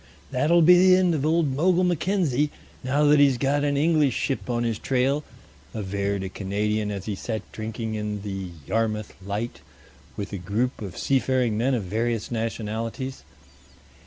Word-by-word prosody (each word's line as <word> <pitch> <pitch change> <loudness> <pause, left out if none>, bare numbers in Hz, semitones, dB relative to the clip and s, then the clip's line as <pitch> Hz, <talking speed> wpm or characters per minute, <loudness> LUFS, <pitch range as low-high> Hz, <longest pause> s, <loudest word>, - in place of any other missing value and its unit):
"That'll 160 +6 +3
be 175 +2 +8
the 185 0 +7
end 185 -2 +3
of 145 -4 -1
old 160 -2 +2
Mogul 180 +4 +3
Mackenzie, 175 -5 +1 0.3
now 140 +4 +1
that 150 0 +5
he's 140 -3 +5
got 140 +3 +1
an 145 -1 +1
English 150 -3 +3
ship 135 -2 -2
on 120 -1 0
his 115 -2 -1
trail," 135 +3 +1 0.5
averred 100 -1 -2
a 95 - -4
Canadian 105 +2 -1
as 100 -2 -5
he 105 - -2
sat 110 +3 -4
drinking 110 0 -4
in 105 -1 -3
the 95 -3 -4 0.2
"Yarmouth 110 +1 -1
Light" 105 +5 -4 0.6
with 100 -1 -5
a 100 - -3
group 110 +9 -2
of 100 -4 -7
seafaring 130 -4 +1
men 125 +5 +1
of 115 - -2
various 115 +4 -2
nationalities. 115 +3 -3
120 Hz, 160 wpm, -25 LUFS, 105-145 Hz, 0.6 s, be